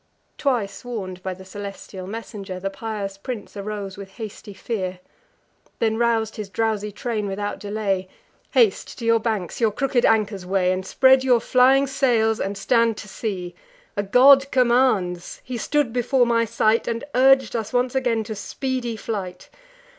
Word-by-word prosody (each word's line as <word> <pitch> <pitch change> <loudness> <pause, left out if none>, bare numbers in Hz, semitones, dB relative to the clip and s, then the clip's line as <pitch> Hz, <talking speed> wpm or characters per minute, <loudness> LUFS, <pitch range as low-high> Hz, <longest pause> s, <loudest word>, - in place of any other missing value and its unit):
Twice 235 -8 -1
warn'd 195 -7 -6
by 185 0 -4
the 190 +1 -13
celestial 195 -1 -8
messenger, 200 -3 -6
The 195 +1 -3
pious 200 -2 -5
prince 215 -2 -6
arose 200 -1 -5
with 195 -1 -10
hasty 215 -2 -8
fear; 190 -4 -4 0.8
Then 220 -1 +1
rous'd 225 -1 +1
his 210 -2 -5
drowsy 210 -1 -1
train 215 0 -3
without 205 +1 -3
delay: 200 -3 -2 0.4
"Haste 450 -5 +2
to 235 - -6
your 230 0 +4
banks; 215 -3 -3
your 225 - +4
crooked 255 +1 0
anchors 210 -3 +2
weigh, 185 0 +1
And 185 0 -1
spread 265 0 +5
your 250 -2 +4
flying 260 +4 +4
sails, 240 -5 +2
and 200 +1 -3
stand 230 +1 +2
to 210 - -8
sea. 190 -4 -4 0.4
A 205 - +1
god 270 +7 +6
commands: 240 -9 +2
he 255 - -6
stood 255 +1 0
before 245 +1 +2
my 230 -1 +2
sight, 225 0 +1
And 230 +1 -2
urg'd 265 -1 +4
us 220 -2 -3
once 245 0 +1
again 245 -4 +1
to 220 - -5
speedy 245 +2 -3
flight. 190 -5 -5
220 Hz, 160 wpm, -23 LUFS, 195-245 Hz, 0.8 s, god